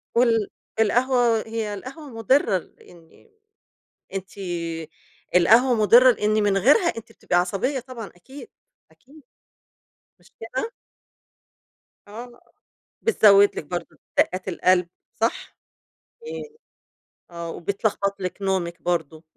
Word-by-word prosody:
وال 230 -3 +3 0.3
القهوة، 240 +1 +3
هي 220 -2 -3
القهوة 270 +9 -9
مُضرّة 225 -2 +2
لإن 170 - -16 0.8
أنتِ 190 -1 -5 1.1
القهوة 225 +9 +5
مُضرّة 235 +4 +6
لإن 215 -2 0
من 200 -1 +2
غيرها 280 - +4
أنتِ 225 0 -9
بتبقي 215 - -3
عصبية 195 +10 0
طبعًا 245 -3 -9
أكيد، 265 - -13 0.4
أكيد. 290 +3 -20 1.0
مش - - -24
كده؟ 460 - -4 1.4
آه. 240 +3 -10 0.6
بتزوّد 205 - +5
لِك - - -4
برضه 175 +2 -6 0.2
دقّات 185 +1 +1
القلب 180 -1 +2 0.3
صح؟ 225 +1 -2 0.7
اي 455 -1 -8 0.8
آه. 170 -1 -6
وبتلخبط 200 +3 -2
لِك 180 +2 -5
نومِك 185 -3 -2
برضه 160 -2 -2
210 Hz, 100 wpm, -23 LUFS, 185-245 Hz, 1.4 s, مُضرّة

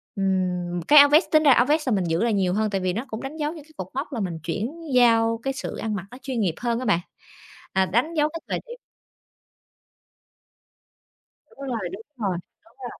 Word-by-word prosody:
ừm, 180 -2 -1
cái 300 0 +9
áo 285 0 +8
vest 305 +5 +5
tính 310 0 +5
ra 290 - +6
áo 245 -1 +5
vest 300 0 +1
là - - +2
mình 190 - 0
giữ 165 +4 0
lại 235 - +1
nhiều 190 -3 +1
hơn 215 +2 +1
tại 195 -2 -2
vì 185 -1 0
nó 230 +7 -3
cũng 220 -3 -6
đánh 275 +4 -6
dấu 300 0 -2
những 315 -4 -10
cái 315 - -21
cột 185 - -5
mốc 275 +3 -4
là 240 - -3
mình 175 -5 -3
chuyển 270 - -4
giao 230 -2 +4
cái 270 - -1
sự 265 - -5
ăn 220 -1 -3
mặc 190 -2 -5
nó 250 - -10
chuyên 260 -4 -3
nghiệp 175 -6 0
hơn 235 -1 -1
á 255 - -4
bạn, 200 -5 +3 0.7
à, 190 0 +2
đánh 245 - 0
dấu 300 -1 +2
cái 330 +1 -7
thời - - -1
điểm 480 - -8 2.7
Đúng - - -23
rồi, 225 -8 -3
đúng 195 +3 -7 0.2
rồi, 195 -6 -1 0.3
đúng 225 - -24
rồi. 245 - -8
230 Hz, 230 wpm, -24 LUFS, 190-280 Hz, 2.7 s, cái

